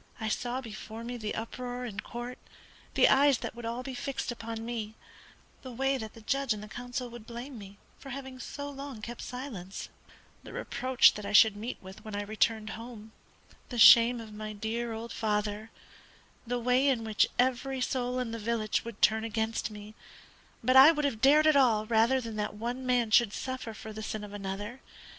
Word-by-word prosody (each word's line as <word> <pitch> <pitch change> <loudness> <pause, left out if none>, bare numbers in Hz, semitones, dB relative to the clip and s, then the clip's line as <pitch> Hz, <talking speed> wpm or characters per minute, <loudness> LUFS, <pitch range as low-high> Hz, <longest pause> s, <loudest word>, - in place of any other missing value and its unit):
I 220 -1 -2
saw 245 +3 -2
before 225 -1 -8
me 245 +1 -5
the 215 -2 -4
uproar 245 +2 -5
in 205 -5 -6
court: 240 +1 -6 0.6
the - - +6
eyes 280 -1 +5
that - - -5
would 240 - -9
be 230 - -5
all 235 +2 -3
fixed 265 0 -4
upon 230 -1 -6
me; 220 -2 -4 0.7
the 260 - -8
way 270 +3 +1
that 220 -2 -7
the 225 - -12
judge 270 +1 0
and 210 - -8
the - - -8
counsel 245 +3 -5
would 235 -2 -11
blame 245 +3 -7
me 200 0 -11 0.2
for 275 - -10
having 265 -1 -7
so 285 +3 -6
long 275 -5 -8
kept 240 +1 -6
silence; 230 -8 -6 0.5
the - - -11
reproach 255 +1 +3
that 210 - -7
I 205 - -4
should 215 0 +7
meet 225 +4 -5
with 190 +3 -11
when 215 -2 -6
I 205 - -2
returned 215 +1 0
home; 225 -1 -9 0.6
the 245 - -5
shame 235 +2 +8
of 220 -2 -9
my 215 0 -6
dear 225 +3 -3
old 225 +1 -6
father; 210 0 -1 0.8
the 245 +1 0
way 250 +3 +2
in 250 -5 +2
which 220 -1 +2
every 260 +1 +1
soul 250 0 -1
in 250 -3 -2
the 230 - -4
village 220 -1 -1
would 235 -2 -8
turn 220 0 +4
against 225 0 -1
me; 210 0 -10 0.7
but 255 +3 +3
I 270 +4 +10
would 300 -2 -1
have 225 -6 -1
dared 295 +3 +6
it 310 -1 +5
all 230 -6 +4
rather 230 +4 +3
than 230 -3 -6
that 210 -1 -2
one 245 +4 -4
man 245 -3 +2
should 215 -2 +5
suffer 260 -3 -4
for 220 0 -9
the 215 - -6
sin 215 0 -4
of 205 -1 -9
another. 205 +5 -5
230 Hz, 200 wpm, -30 LUFS, 215-250 Hz, 0.8 s, I